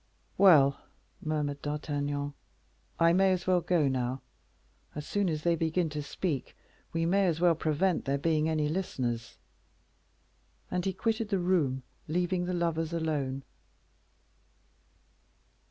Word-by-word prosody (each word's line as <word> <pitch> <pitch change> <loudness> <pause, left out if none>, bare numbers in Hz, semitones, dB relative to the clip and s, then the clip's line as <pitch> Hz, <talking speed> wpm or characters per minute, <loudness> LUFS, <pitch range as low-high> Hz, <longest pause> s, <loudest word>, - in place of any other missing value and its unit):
"Well," 150 -8 +6 0.4
murmured 150 -2 -2
D'Artagnan, 145 -1 -2 0.7
"I 165 0 +5
may 190 +1 +4
as 180 -1 -3
well 185 -1 +3
go 165 -4 +2
now. 130 0 -1 0.7
As 150 - -5
soon 205 -2 0
as 155 -2 -2
they 170 -1 +3
begin 165 +1 0
to 150 0 -3
speak, 145 0 -3 0.3
we 165 0 0
may 195 +3 +3
as 165 -2 0
well 175 -1 +5
prevent 160 +3 0
there 140 +1 +1
being 155 +1 +1
any 155 -2 +1
listeners." 130 -9 -3 1.3
And 180 -1 -1
he 190 - 0
quitted 220 +2 -1
the 200 - +1
room, 165 -8 +1 0.2
leaving 175 +2 0
the 180 - -2
lovers 165 -1 -1
alone. 145 -5 -1
160 Hz, 130 wpm, -30 LUFS, 145-180 Hz, 1.3 s, Well